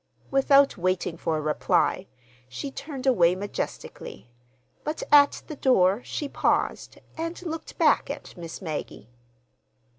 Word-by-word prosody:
Without 275 -1 +4
waiting 180 -1 -1
for 165 -1 -1
a - - -2
reply, 170 +4 +1 0.4
she 275 - -6
turned 275 -2 -7
away 180 -9 +4
majestically; 185 - -6 0.5
but 305 +1 -3
at 285 -1 +6
the 305 - -7
door 205 -6 +3
she 290 - -4
paused - - -1 0.2
and 330 +1 -4
looked 325 -2 -6
back - - +3
at - - -7
Miss 170 +2 -8
Maggie. 150 - -6
205 Hz, 125 wpm, -26 LUFS, 170-285 Hz, 0.5 s, at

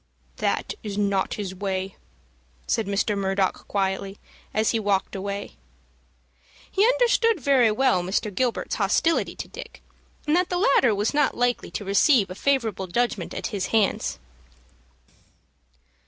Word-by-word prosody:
"That - - -1
is 205 -2 -5
not 200 -2 0
his 195 -3 -5
way," 190 0 -3 0.7
said 220 -3 0
Mr. 200 +1 0
Murdock, 195 -1 -1
quietly, 195 0 -2 0.3
as 215 0 +1
he 230 - 0
walked 200 -3 0
away. 200 +1 -5 1.1
He 395 - +2
understood 480 -4 +3
very 260 -4 +4
well 215 -5 +2
Mr. 195 +3 -2
Gilbert's 245 +4 -1
hostility 265 +12 +1
to - - -6
Dick, - - -11 0.4
and 300 +1 +2
that 360 0 +2
the 360 - -1
latter 270 - +4
was 205 +6 0
not 295 -1 +1
likely 245 0 0
to 205 - -5
receive 200 +1 +3
a - - -3
very - - -15
favorable 220 -7 -4
judgment 240 +7 -1
at - - -4
his 195 -2 -1
hands. 220 -3 +1
205 Hz, 140 wpm, -24 LUFS, 195-255 Hz, 1.1 s, very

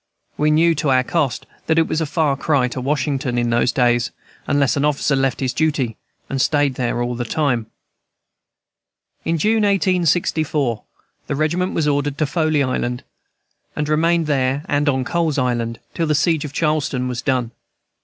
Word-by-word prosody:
We 150 - +1
knew 165 +2 +4
to 155 -2 -1
our 130 -1 +4
cost 145 -2 -1 0.2
that 160 - +2
it 165 - +3
was 160 - -1
a 160 - -1
far 150 -2 +1
cry 140 -3 +1
to 130 - -5
Washington 135 -2 -1
in 120 -1 +1
those 120 +1 +2
days, 120 -1 +2 0.4
unless 140 -2 +2
an 140 - 0
officer 145 -1 +1
left 135 -1 0
his 130 -2 -1
duty 145 -8 0 0.3
and 135 -1 -1
stayed 145 -2 +2
there 120 -1 -1
all 120 0 -2
the 120 0 -3
time. 120 -3 -1 1.6
In 165 0 +1
June, 220 +7 +2
1864, 170 - +1 0.5
the - - -2
regiment 170 +5 0
was 155 -2 +1
ordered 145 0 0
to 155 - +1
Folly 155 -1 +1
Island, 125 -1 -2 0.7
and 150 0 -2
remained 165 +2 +2
there 140 0 0
and 145 +1 +1
on 130 -2 0
Cole's 165 +1 0
Island 120 -3 -1
till 165 - -1
the 150 - +2
siege 155 0 +1
of 145 - -6
Charleston 150 -5 0
was 125 0 -3
done. 130 -4 0
145 Hz, 175 wpm, -20 LUFS, 125-155 Hz, 1.6 s, knew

